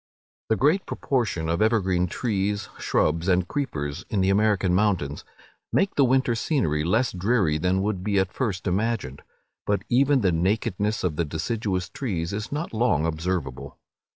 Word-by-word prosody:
The 110 - +3
great 150 - +2
proportion 110 - -1
of 85 +3 0
evergreen 95 -5 +2
trees, 100 -1 -2
shrubs, 80 +3 +1
and 90 -1 +2
creepers, 75 - -3
in 100 - 0
the 95 +1 +3
American 100 -3 +2
mountains, 90 -8 0 0.5
make 195 0 +2
the 140 - +3
winter 130 -1 +3
scenery 110 - 0
less 110 +10 +1
dreary 95 -5 +1
than 95 +3 +1
would 100 -3 -2
be 100 0 0
at 95 -1 +1
first 105 -8 -2
imagined; 100 - -1 0.5
but 100 -1 +1
even 135 +2 +3
the 95 -3 +3
nakedness 100 +4 0
of 85 -5 -1
the 85 - +2
deciduous 90 +3 -2
trees 90 -9 -3
is 105 +2 -4
not 150 0 -3
long 110 -9 +2
observable. 80 -4 -3
100 Hz, 155 wpm, -25 LUFS, 85-115 Hz, 0.5 s, The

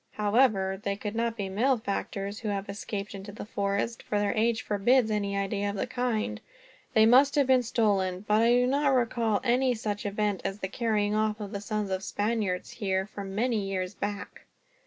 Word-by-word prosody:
However, 205 -3 +2
they 200 0 -1
could 210 +1 -5
not 230 0 -1
be 200 -2 -2
malefactors 205 -2 -1
who 225 - -5
have 200 -1 -2
escaped 200 0 -5
into 195 +1 -8
the 205 - -8
forest, 200 +2 -2
for 210 - -2
their 205 0 +1
age 225 0 +1
forbids 220 +3 +2
any 200 -2 -1
idea 200 +1 -1
of 200 - -4
that 220 +5 -3
kind. 235 - -1 0.5
They 220 0 +7
must 265 +5 +6
have 285 -2 +4
been 260 -1 +4
stolen. 200 -5 0
But 210 +1 +4
I 230 - +4
do 245 +1 +4
not 275 +1 +2
recall 230 -3 +1
any 250 +1 +2
such 210 -2 -3
event 205 -1 -1
as 195 - -3
the 190 - -3
carrying 210 -2 0
off 215 0 0
of 205 -2 -6
the 200 -2 -4
sons 210 -1 -2
of 190 0 -1
Spaniards, 205 -2 -1
here, 190 -3 -1
for 205 0 -8
many 215 +4 0
years 185 0 -2
back. 205 0 -6
210 Hz, 195 wpm, -28 LUFS, 200-230 Hz, 0.5 s, They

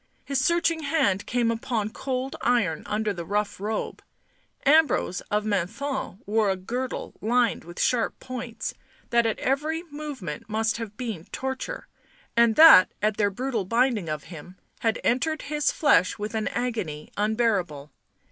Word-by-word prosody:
His 275 -2 0
searching 340 0 +2
hand 280 -11 +1
came 235 -2 +1
upon 225 -2 -2
cold 260 +2 -3
iron 215 -10 +1
under 210 0 -1
the 175 -3 -5
rough 205 +3 -2
robe; 215 +2 -3 0.6
Ambrose 295 - +3
of 210 0 0
Menthon 215 +4 -2
wore 215 0 +2
a 190 - +1
girdle 245 +7 -4
lined 235 +1 +1
with 175 +2 -10
sharp 240 -2 +1
points, 250 -2 -5 0.4
that 235 -1 +4
at 220 - -1
every 305 +5 -1
movement 270 - -6
must 220 +1 0
have 220 -2 -7
been 220 -10 -5
torture, 265 - -5 0.5
and 235 -1 +4
that, 315 - +9
at 215 0 0
their 205 -2 +3
brutal 240 +1 -2
binding 230 -3 +1
of 155 -1 -3
him, 180 +4 -11 0.2
had 225 -1 0
entered 310 +6 0
his 295 0 0
flesh 290 - +3
with 210 +1 -5
an 220 -1 -1
agony 220 -12 -3
unbearable. 205 -9 0
225 Hz, 145 wpm, -26 LUFS, 200-260 Hz, 0.6 s, that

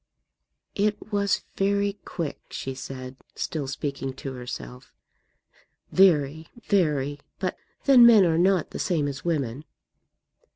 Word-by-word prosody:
"It 210 +1 -1
was 200 -1 +1
very 200 +1 +1
quick," 165 -5 -4
she 135 - -5
said, 130 0 -8 0.2
still 150 -4 -3
speaking 135 -1 -4
to 135 0 -7
herself; 65 - -8 1.0
"very, 160 -4 +3 0.2
very. 145 -7 +1 0.2
But 185 -1 -2 0.3
then 265 -4 +8
men 215 -5 +7
are 165 -1 +2
not 185 -2 +2
the - - -6
same 160 -6 0
as 135 -1 -5
women." 145 -6 -2
155 Hz, 120 wpm, -26 LUFS, 135-195 Hz, 1.0 s, then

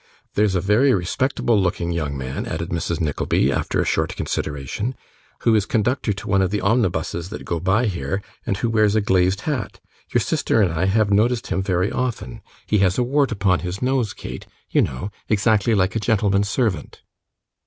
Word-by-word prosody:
There's 105 -2 +2
a 90 - +1
very 105 +8 +4
respectable 110 +4 +1
looking 85 -1 -1
young 75 -5 -2
man,' 65 0 -4
added 80 +2 -4
Mrs. 85 -1 -2
Nickleby, 75 -4 +1
after - - -1
a - - +1
short - - 0
consideration, 75 - -3 0.5
'who 115 - +3
is 105 -3 +2
conductor 120 +2 0
to 100 - -5
one 100 -1 +3
of 95 - +1
the 105 +2 -1
omnibuses 95 -5 0
that 110 - -7
go 85 - -2
by 95 +7 +2
here, 95 0 -2 0.2
and 95 - -1
who 115 +3 -1
wears 110 -2 +3
a 110 - +3
glazed 95 0 +2
hat 140 -8 -3 0.3
your - - +2
sister - - +1
and 95 -6 +3
I 85 +3 0
have 100 +1 +2
noticed 115 +4 +2
him 95 - 0
very 95 0 0
often 120 - -3 0.2
he 105 - +1
has 95 -1 +2
a 125 - +3
wart 140 +2 +1
upon 95 -4 +2
his 90 +2 -4
nose, 130 -5 +1
Kate, - - -8 0.2
you - - +4
know, 65 +11 -3 0.2
exactly 110 +1 +3
like 95 0 +1
a - - +1
gentleman's 100 -2 +1
servant. 105 - -2
100 Hz, 190 wpm, -22 LUFS, 90-110 Hz, 0.5 s, very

